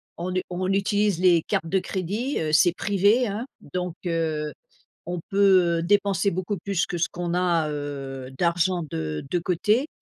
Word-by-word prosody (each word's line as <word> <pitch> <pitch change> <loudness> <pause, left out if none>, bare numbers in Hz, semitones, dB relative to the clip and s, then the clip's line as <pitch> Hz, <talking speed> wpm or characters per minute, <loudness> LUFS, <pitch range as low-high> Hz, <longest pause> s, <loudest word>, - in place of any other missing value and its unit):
on 180 +2 -4
u 185 - +1
on 185 +2 -2
utilise 200 -1 +1
les 175 -3 +5
cartes 165 - -1
de 190 +2 +2
crédit, 205 - -2
heu, 155 -1 -2
c'est 170 +2 +6
privé, 205 +6 +2
hein, 210 +5 -3 0.3
donc 180 -2 -2
heu, 160 -3 -1 0.5
on 175 0 -3
peut, 185 -4 +4
heu, - - -2
dépenser 200 +1 +2
beaucoup 185 +3 -2
plus 190 0 -1
que 175 - -4
ce - - +1
qu'on 175 0 -3
a, 170 -4 +1
heu, 135 -3 -5
d'argent 175 0 +1
de 75 -1 -3
de 175 - +1
côté, 210 - +1
180 Hz, 175 wpm, -25 LUFS, 165-195 Hz, 0.5 s, c'est